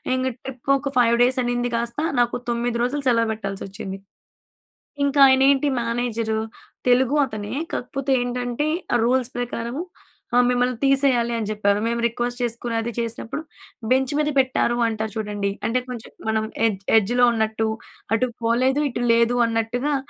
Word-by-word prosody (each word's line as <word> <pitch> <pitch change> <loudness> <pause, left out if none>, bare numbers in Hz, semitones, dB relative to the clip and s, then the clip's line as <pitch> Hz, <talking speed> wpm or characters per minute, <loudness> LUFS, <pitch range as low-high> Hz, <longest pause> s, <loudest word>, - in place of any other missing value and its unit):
ఇంగ 260 0 0 0.2
ట్రిప్ 265 0 -8
ఒక 275 0 -4
5 235 -1 +5
డేస్ 255 +2 +2
అనింది 245 0 -1
కాస్త, 235 +3 -2 0.2
నాకు 240 0 +2
9 235 0 -1
రోజులు 280 +3 -1
సెలవు 230 -1 +2
పెట్టాల్సి 195 -3 -5
వచ్చింది. 195 -1 -7 1.1
ఇంకా 280 0 +2
ఆయనేంటి 270 +2 +4
మేనేజరు, 230 -2 -1 0.5
తెలుగు 260 +3 +3
అతనే 210 -1 -6 0.2
కాకపోతే 270 +2 -3
ఏంటంటే 245 +3 -2 0.3
ఆ 240 - +4
రూల్స్ 255 0 +1
ప్రకారము 245 +4 -3 0.5
ఆహ్, 245 - +6
మిమ్మల్ని 250 0 +1
తీసేయాలి 265 -4 +3
అని 215 -2 -3
చెప్పారు. 205 -1 +1
మేము 235 0 -1
రిక్వెస్ట్ 240 +1 -3
చేసుకుని 235 0 -3
అది 235 +1 -3
చేసినప్పుడు, 230 +5 -3 0.5
బెంచ్ 265 +1 +2
మీద 300 - +1
పెట్టారు 255 -2 +2
అంటారు 220 -1 -3
చూడండి. 205 -2 -2 0.2
అంటే 250 +2 +1
కొంచెం 240 -3 -7 0.2
మనం 220 0 +1 0.2
ఎడ్జ్ 195 -3 -2
ఎడ్జ్‌లో 245 +4 +4
ఉన్నట్టు. 220 0 0 0.5
అటు 255 +3 +1 0.2
పోలేదు, 255 +5 +2
ఇటు 240 0 -3
లేదు 235 +1 +3
అన్నట్టుగా, 230 +5 -1
240 Hz, 145 wpm, -23 LUFS, 225-255 Hz, 1.1 s, ఆహ్